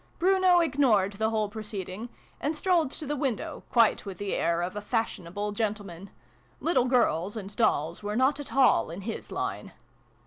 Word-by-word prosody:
Bruno 370 -1 +4
ignored 255 - +2
the 220 +2 0
whole 215 -1 0
proceeding, 210 0 -6 0.3
and 300 +3 -1
strolled 340 -3 +2
to 300 - -6
the 295 +1 -2
window, 270 -6 -2
quite 230 -3 +3
with 195 -3 -7
the 205 +1 -3
air 170 0 +1
of 185 +3 -4
a 210 - -3
fashionable 205 -2 -2
gentleman. 205 -4 -4 0.5
Little 320 -7 +2
girls, 205 - +1
and 200 -1 -7
dolls, 170 -7 +1
were 210 0 -3
not 265 +4 +2
at 290 - -7
all 265 -10 +4
in 170 +4 -7
his 220 +3 -6
line. - - -4
215 Hz, 170 wpm, -28 LUFS, 195-270 Hz, 0.5 s, Bruno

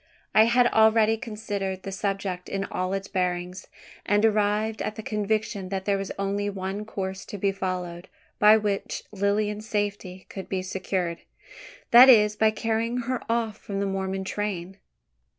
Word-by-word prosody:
I 220 - +7
had 245 +1 +4
already 220 0 +5
considered 205 -5 -4
the 195 - -5
subject 195 -2 -3
in 195 0 -2
all 185 0 -2
its 195 0 -3
bearings; 180 0 -2 0.4
and 205 +2 +2
arrived 215 0 +1
at 215 - -3
the 220 - -7
conviction 210 -2 -2
that 190 -1 -3
there 200 -1 +1
was 195 - -4
only 200 +1 -1
one 195 +1 -4
course 190 -3 -5
to 205 - -7
be 195 0 +1
followed, 185 -2 -4 0.3
by 210 +1 +7
which 205 -2 -2
Lilian's 210 +1 -1
safety 200 -3 -3
could 195 - -8
be 185 -1 -2
secured 185 -2 -2 0.7
that 245 +3 +10
is, 210 -4 +6
by 220 0 +4
carrying 225 +2 -1
her 250 +1 -2
off 230 -2 -1
from 195 -1 -5
the 200 - 0
Mormon 190 0 -2
train. 190 -2 -4
200 Hz, 160 wpm, -26 LUFS, 190-215 Hz, 0.7 s, that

